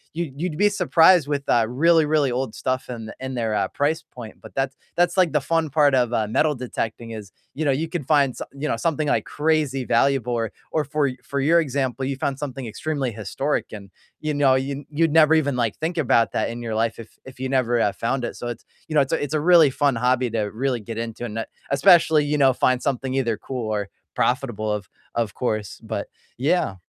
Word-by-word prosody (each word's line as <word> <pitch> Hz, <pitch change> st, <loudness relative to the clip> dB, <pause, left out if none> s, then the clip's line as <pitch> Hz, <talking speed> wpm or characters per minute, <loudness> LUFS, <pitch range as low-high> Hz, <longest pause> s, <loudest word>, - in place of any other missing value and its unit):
you 170 Hz, -3 st, -3 dB
you'd 160 Hz, 0 st, -3 dB
be 205 Hz, 0 st, +5 dB
surprised 180 Hz, -4 st, +4 dB
with, 145 Hz, -1 st, -1 dB
uh, 115 Hz, -2 st, +4 dB
really, 160 Hz, +6 st, +3 dB
really 150 Hz, -3 st, +2 dB
old 125 Hz, -2 st, -2 dB
stuff 130 Hz, +2 st, -2 dB
and 115 Hz, -3 st, -7 dB
and 130 Hz, 0 st, -5 dB
their, 115 Hz, -3 st, -1 dB
uh, -, -, +1 dB
price 150 Hz, +3 st, -1 dB
point. 115 Hz, -3 st, -11 dB
But -, -, -13 dB
that 135 Hz, 0 st, -1 dB, 0.2 s
that's 175 Hz, +1 st, +2 dB
like 180 Hz, -4 st, +4 dB
the 150 Hz, -, +2 dB
fun 160 Hz, 0 st, 0 dB
part 145 Hz, -2 st, +4 dB
of, 125 Hz, -2 st, +1 dB
uh, 110 Hz, -2 st, +1 dB
metal 150 Hz, +8 st, +2 dB
detecting 115 Hz, -3 st, -5 dB
is, 105 Hz, -4 st, -8 dB, 0.2 s
you 155 Hz, +3 st, -2 dB
know, 140 Hz, -, +3 dB
you 155 Hz, +4 st, -1 dB
could 165 Hz, -5 st, -4 dB
find 140 Hz, -3 st, +3 dB
so -, -, -5 dB
you 140 Hz, +2 st, -4 dB
know, -, -, -1 dB
something, 155 Hz, -3 st, -1 dB
like, 145 Hz, -, +1 dB
crazy 150 Hz, -4 st, 0 dB
valuable 135 Hz, -3 st, +2 dB
or 115 Hz, -2 st, -1 dB, 0.2 s
or 155 Hz, -, +1 dB
for 145 Hz, 0 st, 0 dB
for 140 Hz, -, -3 dB
your 160 Hz, +5 st, +4 dB
example, 135 Hz, -3 st, -1 dB
you 135 Hz, +1 st, -2 dB
found 135 Hz, 0 st, -2 dB
something 135 Hz, -3 st, -5 dB
extremely 135 Hz, +3 st, -3 dB
historic 110 Hz, +7 st, -2 dB
and, 100 Hz, -2 st, -9 dB, 0.3 s
you 155 Hz, -1 st, -2 dB
know, 140 Hz, -2 st, +4 dB
you 135 Hz, +2 st, -2 dB
you'd 160 Hz, +1 st, +1 dB
never 160 Hz, 0 st, +6 dB
even, 145 Hz, -4 st, +2 dB
like, 115 Hz, -4 st, 0 dB
think 165 Hz, +2 st, -3 dB
about 115 Hz, -6 st, +3 dB
that -, -, 0 dB
in 120 Hz, +1 st, -7 dB
your 115 Hz, -2 st, -4 dB
life 115 Hz, +1 st, 0 dB
if 115 Hz, -, -12 dB
if 130 Hz, -1 st, -12 dB
you 130 Hz, 0 st, -3 dB
never, 125 Hz, -3 st, +1 dB
uh, 105 Hz, -, +2 dB
found 125 Hz, +2 st, -2 dB
it. -, -, -4 dB
So 120 Hz, -, -6 dB
it's 120 Hz, -, -7 dB, 0.2 s
you 155 Hz, -, -6 dB
know, 150 Hz, -, +6 dB
it's 135 Hz, +3 st, -1 dB
a -, -, 0 dB
it's 145 Hz, -, -4 dB
a 155 Hz, -, +2 dB
really 165 Hz, -3 st, +6 dB
fun 140 Hz, -1 st, +1 dB
hobby 125 Hz, +1 st, +1 dB
to 115 Hz, -1 st, -1 dB
really 120 Hz, +5 st, -2 dB
get 110 Hz, +1 st, -7 dB
into 115 Hz, +1 st, -5 dB
and, 115 Hz, -1 st, -5 dB
uh, -, -, -3 dB, 0.3 s
especially, 155 Hz, +2 st, +5 dB
you 150 Hz, +1 st, 0 dB
know, 135 Hz, -2 st, +5 dB
find 125 Hz, 0 st, +1 dB
something 135 Hz, -1 st, -1 dB
either 120 Hz, -4 st, +1 dB
cool 125 Hz, -4 st, -5 dB
or 100 Hz, -2 st, -2 dB, 0.3 s
profitable 120 Hz, -4 st, 0 dB
of 105 Hz, -3 st, -4 dB, 0.3 s
of 115 Hz, -3 st, -1 dB
course. 110 Hz, -5 st, -3 dB
But -, -, -4 dB, 0.3 s
yeah. 140 Hz, -, +1 dB
135 Hz, 230 wpm, -23 LUFS, 120-150 Hz, 0.3 s, never